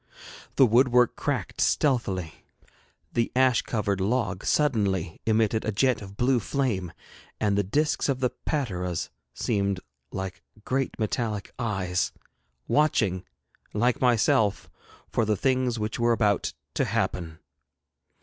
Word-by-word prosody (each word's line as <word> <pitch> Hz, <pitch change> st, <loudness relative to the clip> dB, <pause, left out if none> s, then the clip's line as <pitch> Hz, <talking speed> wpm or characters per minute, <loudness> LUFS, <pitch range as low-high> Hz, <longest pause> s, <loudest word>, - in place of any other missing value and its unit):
The 135 Hz, -, +7 dB
woodwork 125 Hz, +1 st, +4 dB
cracked -, -, -2 dB
stealthily, 95 Hz, -, 0 dB, 0.7 s
the 115 Hz, -1 st, 0 dB
ash 130 Hz, -2 st, +4 dB
covered 100 Hz, -4 st, -1 dB
log 100 Hz, -2 st, 0 dB
suddenly 100 Hz, -, +1 dB
emitted 110 Hz, 0 st, +2 dB
a 110 Hz, -, -1 dB
jet 125 Hz, +4 st, +2 dB
of 100 Hz, 0 st, -10 dB
blue 125 Hz, 0 st, +3 dB
flame, 110 Hz, -, -1 dB, 0.5 s
and 105 Hz, -2 st, +1 dB
the 100 Hz, -, +3 dB
discs 145 Hz, +11 st, 0 dB
of 135 Hz, -2 st, 0 dB
the 125 Hz, -2 st, +1 dB
pateras 90 Hz, -, -3 dB, 0.2 s
seemed 100 Hz, -4 st, 0 dB, 0.3 s
like 95 Hz, -1 st, -5 dB, 0.2 s
great 135 Hz, 0 st, -1 dB
metallic 110 Hz, -2 st, -2 dB
eyes, 95 Hz, -6 st, -1 dB, 0.6 s
watching, 110 Hz, -11 st, +2 dB, 0.5 s
like 120 Hz, +4 st, +1 dB
myself, 110 Hz, -4 st, +2 dB, 0.4 s
for 115 Hz, -, 0 dB
the 105 Hz, -1 st, +1 dB
things 130 Hz, -1 st, +1 dB
which 110 Hz, +1 st, -3 dB
were 120 Hz, 0 st, +3 dB
about 105 Hz, -3 st, +1 dB, 0.2 s
to -, -, +1 dB
happen. 80 Hz, -3 st, -2 dB
110 Hz, 120 wpm, -26 LUFS, 95-125 Hz, 0.7 s, The